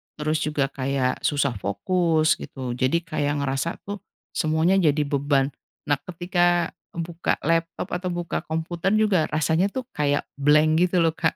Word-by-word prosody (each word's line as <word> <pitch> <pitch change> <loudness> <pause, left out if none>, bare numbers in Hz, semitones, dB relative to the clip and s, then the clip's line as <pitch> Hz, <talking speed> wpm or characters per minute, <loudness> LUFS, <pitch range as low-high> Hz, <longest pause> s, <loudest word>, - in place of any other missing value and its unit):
terus 155 +1 -1
juga 145 -2 -1
kayak 130 -1 -1
susah 145 -2 +1
fokus 160 - +1
gitu, 130 -2 -6
jadi 130 +4 +2
kayak 145 -3 -1
ngerasa 135 +4 -1
tuh 205 0 -6 0.3
semuanya 160 +4 +2
jadi 150 -4 +3
beban, 140 -1 +1 0.3
nah 145 -1 +1
ketika 175 0 +1 0.2
buka 170 0 -1
laptop 165 +1 0
atau 180 +1 -2
buka 175 -1 -2
komputer 165 +3 -2
juga 205 -7 +3
rasanya 160 +4 +2
tuh 260 +5 -4
kayak 145 -1 +1 0.2
blank 150 +2 +5 0.2
gitu 175 -1 +2
loh 165 - +3
Kak, 160 0 0
155 Hz, 150 wpm, -24 LUFS, 145-175 Hz, 0.3 s, blank